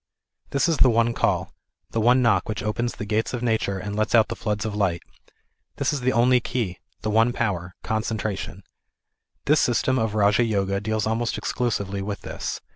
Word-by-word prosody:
This 140 Hz, +2 st, +1 dB
is 165 Hz, -3 st, +1 dB
the 130 Hz, -, +6 dB
one 115 Hz, 0 st, +2 dB
call, -, -, 0 dB, 0.4 s
the 115 Hz, -, 0 dB
one 125 Hz, +3 st, +4 dB
knock 100 Hz, -6 st, +2 dB
which 105 Hz, -, -3 dB
opens 120 Hz, +3 st, -1 dB
the 105 Hz, -, -5 dB
gates 110 Hz, +4 st, -1 dB
of 120 Hz, -, -5 dB
Nature 110 Hz, -4 st, 0 dB
and 100 Hz, +2 st, -5 dB
lets 110 Hz, +2 st, +1 dB
out 110 Hz, -2 st, +5 dB
the -, -, -3 dB
floods 105 Hz, -2 st, -2 dB
of 105 Hz, -2 st, -3 dB
light. 95 Hz, -5 st, 0 dB, 0.7 s
This -, -, 0 dB
is 140 Hz, -, -2 dB
the 130 Hz, +1 st, +2 dB
only 125 Hz, +1 st, +4 dB
key, 110 Hz, -8 st, -3 dB, 0.2 s
the 110 Hz, -, -1 dB
one 115 Hz, +3 st, +4 dB
power 95 Hz, -8 st, -2 dB
ŌĆö -, -, -11 dB
concentration. 110 Hz, -3 st, -3 dB, 0.8 s
This 150 Hz, +1 st, +4 dB
system 130 Hz, +2 st, +2 dB
of 110 Hz, -1 st, -1 dB
Raja 105 Hz, +2 st, +4 dB
Yoga, 100 Hz, -3 st, 0 dB
deals 110 Hz, 0 st, -1 dB
almost 115 Hz, +1 st, -1 dB
exclusively 100 Hz, -5 st, -2 dB
with 100 Hz, 0 st, -4 dB
this. -, -, -5 dB
110 Hz, 195 wpm, -24 LUFS, 100-120 Hz, 0.8 s, the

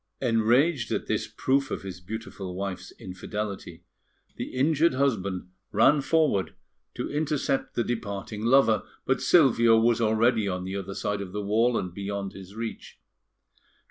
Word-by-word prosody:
Enraged 120 Hz, +3 st, +2 dB
at -, -, -1 dB
this -, -, -1 dB
proof 135 Hz, +1 st, 0 dB
of -, -, -4 dB
his 90 Hz, -2 st, -7 dB
beautiful 95 Hz, -2 st, -6 dB
wife's 95 Hz, -1 st, -5 dB
infidelity, 95 Hz, -1 st, -6 dB, 0.5 s
the -, -, -4 dB
injured 150 Hz, +3 st, +2 dB
husband 100 Hz, -9 st, -1 dB, 0.2 s
ran 140 Hz, +7 st, +4 dB
forward 150 Hz, -, +1 dB, 0.4 s
to -, -, -3 dB
intercept 145 Hz, -2 st, -1 dB
the 120 Hz, -, +1 dB
departing 105 Hz, -2 st, -4 dB
lover; 115 Hz, -2 st, +4 dB, 0.2 s
but 130 Hz, -, +1 dB
Silvio 115 Hz, -8 st, +5 dB
was 115 Hz, +1 st, +3 dB
already 110 Hz, 0 st, +2 dB
on 90 Hz, -1 st, -2 dB
the 95 Hz, +1 st, -5 dB
other 95 Hz, 0 st, -5 dB
side 100 Hz, -1 st, -2 dB
of 95 Hz, -2 st, -7 dB
the 105 Hz, 0 st, -3 dB
wall, 115 Hz, +4 st, +2 dB
and 90 Hz, -2 st, -3 dB
beyond 100 Hz, 0 st, -4 dB
his 95 Hz, +1 st, -11 dB
reach. 115 Hz, 0 st, -6 dB
110 Hz, 145 wpm, -27 LUFS, 100-130 Hz, 0.5 s, Silvio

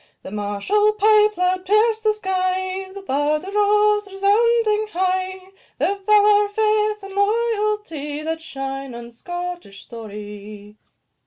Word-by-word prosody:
The -, -, -8 dB
martial 210 Hz, -, +1 dB
pipe 425 Hz, 0 st, +4 dB
loud 365 Hz, +1 st, +1 dB
pierced 435 Hz, +3 st, +2 dB
the 430 Hz, -, +4 dB
sky, 375 Hz, -1 st, -2 dB
The 395 Hz, 0 st, -10 dB
bard 295 Hz, 0 st, 0 dB
arose, 415 Hz, +1 st, +2 dB
resounding 430 Hz, +2 st, +2 dB
high 375 Hz, 0 st, -2 dB, 0.3 s
Their 400 Hz, -, +1 dB
valour, 415 Hz, +1 st, +4 dB
faith, 425 Hz, 0 st, +1 dB
and 390 Hz, 0 st, -9 dB
loyalty, 415 Hz, -8 st, -1 dB
That 320 Hz, +1 st, -3 dB
shine 270 Hz, -3 st, -6 dB
in 235 Hz, 0 st, -9 dB
Scottish 350 Hz, -, -7 dB
story. 210 Hz, -2 st, -10 dB
385 Hz, 115 wpm, -21 LUFS, 300-420 Hz, 0.3 s, pipe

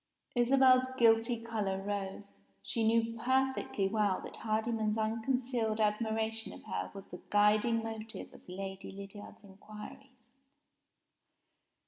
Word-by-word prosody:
Isabel's 255 Hz, +1 st, +5 dB
guilty 230 Hz, 0 st, +4 dB
color 215 Hz, -4 st, -2 dB
rose. 200 Hz, 0 st, -5 dB, 0.2 s
She 210 Hz, +3 st, -1 dB
knew 230 Hz, +1 st, +2 dB
perfectly 260 Hz, -5 st, +1 dB
well 205 Hz, -2 st, +1 dB
that -, -, -9 dB
Hardyman's 220 Hz, 0 st, 0 dB
unconcealed 225 Hz, 0 st, 0 dB
admiration 220 Hz, +1 st, 0 dB
of -, -, -11 dB
her 90 Hz, 0 st, -3 dB
was 195 Hz, -, -9 dB
the -, -, -8 dB
guiding 215 Hz, +3 st, +3 dB
motive 225 Hz, 0 st, -6 dB
of -, -, -14 dB
Lady 190 Hz, +1 st, -6 dB
Lydiard's 200 Hz, +2 st, -10 dB
inquiries. 215 Hz, +6 st, -12 dB
220 Hz, 110 wpm, -33 LUFS, 205-230 Hz, 0.2 s, Isabel's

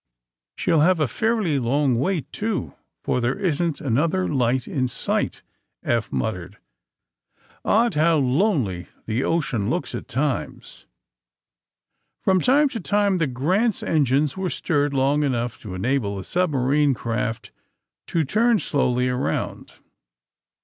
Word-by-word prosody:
' -, -, -65 dB
' -, -, -68 dB
She -, -, 0 dB
'11 160 Hz, -1 st, +5 dB
have 185 Hz, -2 st, +3 dB
a 150 Hz, -, +2 dB
fairly 215 Hz, -, 0 dB
long 135 Hz, +2 st, +1 dB
wait, 165 Hz, +2 st, -1 dB
too, 210 Hz, -, -2 dB, 0.3 s
for 125 Hz, -, 0 dB
there 120 Hz, +2 st, 0 dB
isn't 170 Hz, -3 st, -1 dB
another 155 Hz, +9 st, +1 dB
light 125 Hz, -2 st, 0 dB
in 130 Hz, -2 st, -1 dB
sight," 125 Hz, -, -2 dB, 0.4 s
Eph 115 Hz, -2 st, 0 dB
muttered. 95 Hz, -3 st, -3 dB, 1.1 s
"Odd 230 Hz, 0 st, +3 dB
how 160 Hz, +2 st, +3 dB
lonely 130 Hz, -, +1 dB, 0.2 s
the 115 Hz, +4 st, -1 dB
ocean 135 Hz, -11 st, 0 dB
looks -, -, -2 dB
at -, -, -6 dB
times." 130 Hz, -, -3 dB, 1.3 s
From 190 Hz, -2 st, +2 dB
time 285 Hz, +4 st, +4 dB
to 230 Hz, -, -5 dB
time 200 Hz, 0 st, +1 dB
the 165 Hz, -, +1 dB
"Grant's" 185 Hz, -, 0 dB
engines 145 Hz, -1 st, +1 dB
were 190 Hz, -1 st, -2 dB
stirred 145 Hz, -5 st, 0 dB
long 135 Hz, +3 st, +2 dB
enough 120 Hz, -4 st, -1 dB
to 100 Hz, -4 st, -7 dB
enable 105 Hz, 0 st, -1 dB
the 95 Hz, -, -5 dB
subma 150 Hz, -, 0 dB
rine 145 Hz, -1 st, +3 dB
craft 115 Hz, -1 st, -3 dB, 0.6 s
to 165 Hz, -, +1 dB
turn 225 Hz, -, +2 dB
slowly 125 Hz, -8 st, +1 dB
around. 125 Hz, +1 st, -2 dB
140 Hz, 140 wpm, -23 LUFS, 120-180 Hz, 1.3 s, 11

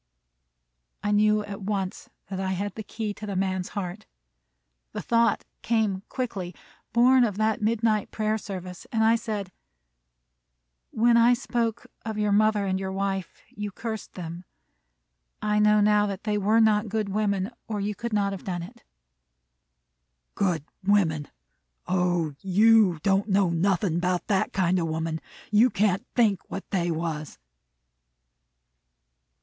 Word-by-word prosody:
I 205 Hz, -, 0 dB
knew 210 Hz, 0 st, +3 dB
at 205 Hz, 0 st, -7 dB
once 195 Hz, -2 st, -3 dB, 0.2 s
that 190 Hz, -, -3 dB
I 190 Hz, 0 st, -1 dB
had 200 Hz, +1 st, -3 dB
the 220 Hz, -, -6 dB
key 215 Hz, 0 st, -4 dB
to 210 Hz, +1 st, -8 dB
the 200 Hz, -, -3 dB
man's 185 Hz, -1 st, -1 dB
heart. 195 Hz, +2 st, -5 dB, 0.9 s
The -, -, -4 dB
thought 230 Hz, -2 st, +2 dB, 0.2 s
came 215 Hz, -5 st, 0 dB
quickly, 195 Hz, -9 st, -4 dB, 0.4 s
born 250 Hz, +2 st, +5 dB
of 210 Hz, -4 st, 0 dB
that 215 Hz, 0 st, +1 dB
midnight 215 Hz, -1 st, +1 dB
prayer 215 Hz, 0 st, -1 dB
service, 185 Hz, -3 st, -7 dB
and 220 Hz, -1 st, +2 dB
I 225 Hz, +1 st, +5 dB
said, 210 Hz, -5 st, -4 dB, 1.4 s
"When 235 Hz, +1 st, +3 dB
I 235 Hz, +1 st, +6 dB
spoke 235 Hz, -2 st, -2 dB, 0.2 s
of 220 Hz, -1 st, -4 dB
your 210 Hz, -1 st, +1 dB
mother 210 Hz, 0 st, +3 dB
and 190 Hz, -1 st, 0 dB
your 190 Hz, 0 st, -3 dB
wife, 195 Hz, -2 st, -3 dB
you 210 Hz, 0 st, -5 dB
cursed 220 Hz, +1 st, -6 dB
them; 170 Hz, 0 st, -7 dB, 1.0 s
I 210 Hz, 0 st, +1 dB
know 210 Hz, 0 st, +5 dB
now 210 Hz, 0 st, +4 dB
that 200 Hz, -1 st, -5 dB
they 210 Hz, -1 st, 0 dB
were 210 Hz, +2 st, +3 dB
not 215 Hz, -1 st, +3 dB
good 215 Hz, -1 st, -1 dB
women, 200 Hz, 0 st, 0 dB, 0.2 s
or 215 Hz, -2 st, -3 dB
you 205 Hz, +1 st, -1 dB
could 235 Hz, +3 st, -5 dB
not 200 Hz, -2 st, +1 dB
have 195 Hz, -, -6 dB
done 175 Hz, -3 st, -3 dB
it." 175 Hz, -, -12 dB, 1.5 s
"Good 175 Hz, -7 st, 0 dB, 0.2 s
women! 175 Hz, -7 st, +2 dB, 0.6 s
O, 175 Hz, -4 st, 0 dB
you 205 Hz, -1 st, +5 dB
don't 195 Hz, +2 st, +2 dB
know 195 Hz, -2 st, +3 dB
nothin' 175 Hz, 0 st, +1 dB
'bout 180 Hz, 0 st, 0 dB
that 195 Hz, -3 st, +1 dB
kind 185 Hz, -1 st, +1 dB
of 165 Hz, -, -1 dB
woman! 160 Hz, 0 st, -2 dB, 0.3 s
You 220 Hz, +4 st, +5 dB
can't 200 Hz, -4 st, +1 dB
think 215 Hz, -6 st, +3 dB
what 195 Hz, -, -6 dB
they 175 Hz, -3 st, 0 dB
was!" 160 Hz, -2 st, -3 dB
205 Hz, 145 wpm, -26 LUFS, 185-215 Hz, 1.5 s, I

